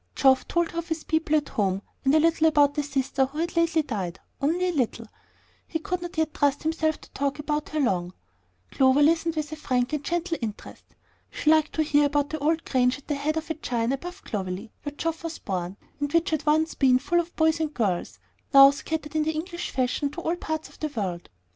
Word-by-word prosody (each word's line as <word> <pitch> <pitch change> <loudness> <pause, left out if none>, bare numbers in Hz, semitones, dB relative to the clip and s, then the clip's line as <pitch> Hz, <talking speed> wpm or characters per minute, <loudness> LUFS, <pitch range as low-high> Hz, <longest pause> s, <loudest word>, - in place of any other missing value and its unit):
Geoff 265 -1 +4
told 345 -1 0
her 335 - -3
of 335 - -6
his 320 -2 -3
people 320 -1 +1
at 295 -1 0
home, 195 -2 0 0.2
and 275 +2 +4
a - - +6
little 320 0 +3
about 290 -2 +4
the 295 - 0
sister 270 -1 0
who 280 +3 -11
had 335 +2 -2
lately 335 -1 +2
died; 190 - -4 0.2
only 340 +6 +1
a - - -2
little, 235 -5 -1 0.6
he 320 - -2
could 360 +3 -3
not 350 -1 -7
yet 315 -1 0
trust 285 -1 +1
himself 315 -1 0
to - - -16
talk 280 +1 -2
long - - -18
about 300 0 -2
her. 195 - 0 0.6
Clover 265 +2 +4
listened 330 +1 +2
with 305 -1 -3
frank 255 -1 0
and 295 -1 -1
gentle 345 0 -2
interest. 215 -3 -7 0.3
She 305 - +1
liked 315 -1 +3
to 315 - +1
hear 295 -1 +3
about 290 0 0
the 315 - -3
old 315 +3 0
grange 250 -1 +2
at 280 - -18
the 300 - 0
head 295 +3 -1
of 320 +1 -3
a - - +1
chine 240 -6 -1
above 355 +8 -5
Clovelley, 195 +2 -4
where 290 -1 -6
Geoff 330 -1 -2
was 330 -1 -4
born, 185 -1 -4 0.2
and 290 0 -2
which 335 +1 +2
had 310 -1 -2
once 315 +2 +3
been 260 -2 +4
full 345 +6 +1
of 345 0 -4
boys 320 0 +2
and 315 -2 -1
girls, 200 - -1 0.4
now 275 0 +10
scattered 300 +1 -5
in 310 - +3
the 315 +1 0
English 345 +3 -4
fashion 260 +2 0
to 345 +5 -7
all 335 +1 0
parts 315 -2 -4
of - - -19
the 310 - -1
world. 190 -10 -4
300 Hz, 225 wpm, -26 LUFS, 265-320 Hz, 0.6 s, now